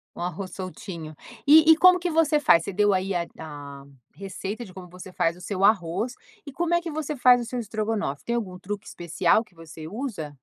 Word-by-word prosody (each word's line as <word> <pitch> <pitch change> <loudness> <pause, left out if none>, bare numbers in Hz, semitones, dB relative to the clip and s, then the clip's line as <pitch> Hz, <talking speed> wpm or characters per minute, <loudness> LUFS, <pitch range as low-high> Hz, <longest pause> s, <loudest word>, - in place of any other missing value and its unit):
Um - - -8
arroz 180 +1 -4
soltinho. 175 -4 -7 0.3
E 315 +2 +7
e 320 - +6
como 365 +1 +6
que 350 0 -2
você 315 -2 +3
faz? 170 - +4
Você 200 - -5
deu 205 0 +3
aí 190 +1 -1 0.2
da 145 -3 -9 0.3
receita 195 +4 -6
de 185 - -14
como 180 -2 -10
você 180 +1 -11
faz 170 -1 0
o - - -14
seu 195 +1 -3
arroz, 200 +4 +2 0.3
e 285 - -8
como 345 +4 -1
é 345 - +3
que 335 - -6
você 300 -1 -4
faz 250 -1 +5
o - - -5
seu 245 +1 -4
estrogonofe? 215 -8 -3
Tem 235 - -1
algum 190 -6 -4
truque 205 +3 -6
especial 175 +5 +1
que 180 - -27
você 160 -1 -10
usa? 195 - -6
195 Hz, 215 wpm, -25 LUFS, 175-250 Hz, 0.3 s, E